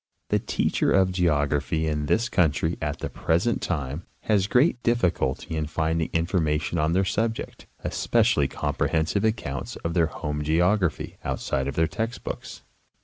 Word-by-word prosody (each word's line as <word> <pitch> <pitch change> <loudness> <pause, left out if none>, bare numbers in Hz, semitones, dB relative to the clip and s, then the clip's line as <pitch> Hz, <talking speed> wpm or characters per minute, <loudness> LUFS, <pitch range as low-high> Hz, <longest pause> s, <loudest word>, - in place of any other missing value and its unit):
The - - +2
teacher - - 0
of 95 -1 +4
geography 80 -2 +1
in 75 -2 -1
this 100 - +2
country 80 -3 +1
at 75 -2 -2
the - - -2
present 90 +9 0
time 75 0 -3
has 100 -3 +2
great 125 +3 +3
difficulty 90 - 0
in 80 -1 -1
finding 80 +1 0
information 80 -2 0
on 80 +2 +2
their 95 +2 +2
subject, 110 +4 -2 0.2
especially - - +2
comprehensive 80 +5 0
accounts 110 - -2
of 85 - 0
their 85 -2 +3
home 75 0 -4
geography, 85 0 +1
outside 65 0 -1
of 70 - -3
their 80 - +3
text 110 +8 -4
books. - - -6
80 Hz, 145 wpm, -25 LUFS, 75-95 Hz, 0.2 s, of